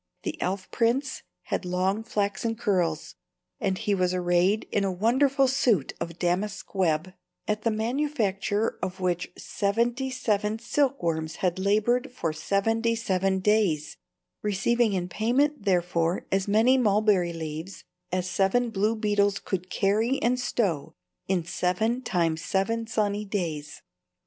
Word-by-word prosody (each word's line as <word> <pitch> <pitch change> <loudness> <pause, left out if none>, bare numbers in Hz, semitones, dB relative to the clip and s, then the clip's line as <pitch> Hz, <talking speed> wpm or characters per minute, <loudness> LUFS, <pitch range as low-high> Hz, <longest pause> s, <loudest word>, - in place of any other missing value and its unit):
The 330 -1 -4
elf 190 +1 -2
prince 250 +4 0 0.2
had - - -2
long 185 +3 0
flaxen 210 +1 -1
curls, 180 -8 0 0.5
and 195 -6 0
he 205 - 0
was 185 -1 +1
arrayed 180 +3 +2
in 205 - +1
a 195 - 0
wonderful 265 +8 +3
suit 240 - +2
of 170 0 -5
damask 190 +4 -2
web, 180 -2 0 0.3
at 210 0 0
the 230 - +1
manufacture 220 -3 -1
of 185 +1 -4
which 180 -1 -1
seventy 235 +6 0
seven 215 -4 0
silkworms 175 - 0
had 180 0 0
labored 215 +6 +1
for 165 -11 -2
seventy 225 +8 +1
seven 190 -3 0
days, 185 -8 +1 0.4
receiving 215 +2 +1
in 180 -2 -1
payment 245 +7 +1
therefor 175 -2 +1
as 195 0 +1
many 225 +6 +4
mulberry 205 -5 +3
leaves 165 +2 -6 0.3
as 185 0 -1
seven 195 +6 +1
blue 215 +2 +1
beetles 205 -2 +1
could 185 -2 -4
carry 220 +9 +1
and 250 +1 +2
stow 170 - -1 0.3
in 185 -3 0
seven 190 +7 0
times 165 -8 0
seven 225 +4 0
sunny 210 -2 0
days. 160 -8 -4
200 Hz, 135 wpm, -27 LUFS, 180-230 Hz, 0.5 s, many